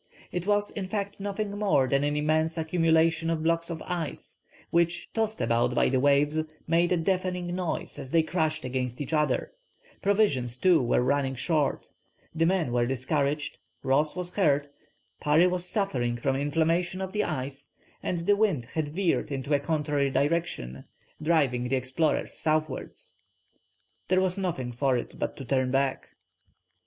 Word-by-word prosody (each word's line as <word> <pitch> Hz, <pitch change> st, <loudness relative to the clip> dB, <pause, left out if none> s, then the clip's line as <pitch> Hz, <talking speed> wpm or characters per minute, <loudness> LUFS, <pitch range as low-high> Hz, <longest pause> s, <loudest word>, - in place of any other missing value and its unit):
It 180 Hz, +1 st, -3 dB
was 205 Hz, 0 st, +2 dB
in 195 Hz, -2 st, -4 dB
fact 200 Hz, 0 st, -3 dB
nothing 200 Hz, +1 st, -3 dB
more 195 Hz, -11 st, +3 dB
than 140 Hz, +2 st, +2 dB
an 145 Hz, 0 st, 0 dB
immense 155 Hz, +2 st, +1 dB
accumulation 165 Hz, 0 st, +2 dB
of 160 Hz, -1 st, -1 dB
blocks 165 Hz, +1 st, +1 dB
of 165 Hz, -2 st, -5 dB
ice, 175 Hz, -4 st, -5 dB, 0.3 s
which, 170 Hz, 0 st, +1 dB
tossed 220 Hz, -1 st, 0 dB
about 115 Hz, 0 st, +1 dB
by -, -, +3 dB
the 130 Hz, -, +2 dB
waves, 145 Hz, +3 st, +3 dB, 0.3 s
made 170 Hz, +2 st, +2 dB
a 180 Hz, -, +3 dB
deafening 180 Hz, 0 st, -1 dB
noise 175 Hz, -4 st, -3 dB
as 135 Hz, -2 st, -7 dB
they 165 Hz, +3 st, +3 dB
crashed 155 Hz, -3 st, -1 dB
against 125 Hz, -1 st, -3 dB
each 145 Hz, +2 st, -4 dB
other; 150 Hz, -1 st, +1 dB, 0.5 s
provisions 170 Hz, -, +1 dB
too 180 Hz, +1 st, +4 dB
were 125 Hz, 0 st, +2 dB
running 135 Hz, 0 st, +1 dB
short, 145 Hz, +3 st, 0 dB, 0.5 s
the 165 Hz, 0 st, +2 dB
men 175 Hz, -8 st, +1 dB
were 120 Hz, 0 st, +1 dB
discouraged, 140 Hz, +3 st, -1 dB, 0.2 s
Ross 145 Hz, +3 st, +2 dB
was 180 Hz, -1 st, -4 dB
hurt, 145 Hz, -7 st, +2 dB, 0.5 s
Parry 150 Hz, +4 st, +4 dB
was 180 Hz, 0 st, 0 dB
suffering 125 Hz, -, -1 dB
from 135 Hz, +3 st, 0 dB
inflammation 165 Hz, +6 st, 0 dB
of 190 Hz, 0 st, -4 dB
the 210 Hz, -, +1 dB
eyes, 140 Hz, -2 st, -4 dB, 0.3 s
and 170 Hz, -2 st, -2 dB
the 205 Hz, -, +5 dB
wind 195 Hz, -, +1 dB
had 160 Hz, -2 st, -1 dB
veered 170 Hz, 0 st, 0 dB
into 140 Hz, +2 st, -2 dB
a 145 Hz, -, +4 dB
contrary 150 Hz, -2 st, 0 dB
direction, 140 Hz, -, -1 dB, 0.4 s
driving 140 Hz, -7 st, +2 dB
the 135 Hz, -, +1 dB
explorers 130 Hz, +5 st, 0 dB
southwards. 155 Hz, -2 st, -2 dB, 0.9 s
There 185 Hz, 0 st, +3 dB
was 185 Hz, -1 st, +2 dB
nothing 170 Hz, -11 st, -2 dB
for 130 Hz, +1 st, +1 dB
it 120 Hz, -, -6 dB
but -, -, -3 dB
to 135 Hz, -, -7 dB
turn 130 Hz, +1 st, +1 dB
back. 135 Hz, 0 st, 0 dB
155 Hz, 160 wpm, -27 LUFS, 135-175 Hz, 0.9 s, the